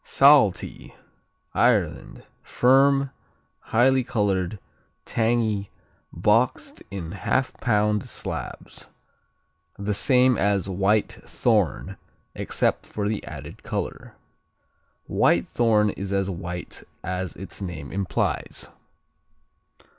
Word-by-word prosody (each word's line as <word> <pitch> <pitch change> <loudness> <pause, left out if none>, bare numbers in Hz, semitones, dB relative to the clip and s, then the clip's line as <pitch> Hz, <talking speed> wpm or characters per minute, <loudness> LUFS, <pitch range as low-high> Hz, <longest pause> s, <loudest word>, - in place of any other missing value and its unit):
Saltee 135 -8 +3 0.6
Ireland - - +1 0.2
Firm; 135 +2 +3 0.5
highly 130 +3 +3
colored; 100 -4 -1 0.5
tangy; 110 -3 0 0.4
boxed - - +1
in 90 -4 -6
half 125 +6 -1
pound 105 -2 +1
slabs. - - -6 0.9
The 100 +1 -2
same 125 +2 +4
as 100 -1 +2
Whitethorn 100 +3 0 0.4
except - - -1
for 105 -1 -3
the 105 0 -2
added - - -9
color. - - -5 0.9
Whitethorn 110 -3 +2
is 100 0 -6
as 100 -1 0
white 90 0 -6 0.2
as 90 -2 -3
its 95 +1 -8
name 85 -7 -6
implies. 100 -1 -2
105 Hz, 85 wpm, -24 LUFS, 95-120 Hz, 0.9 s, same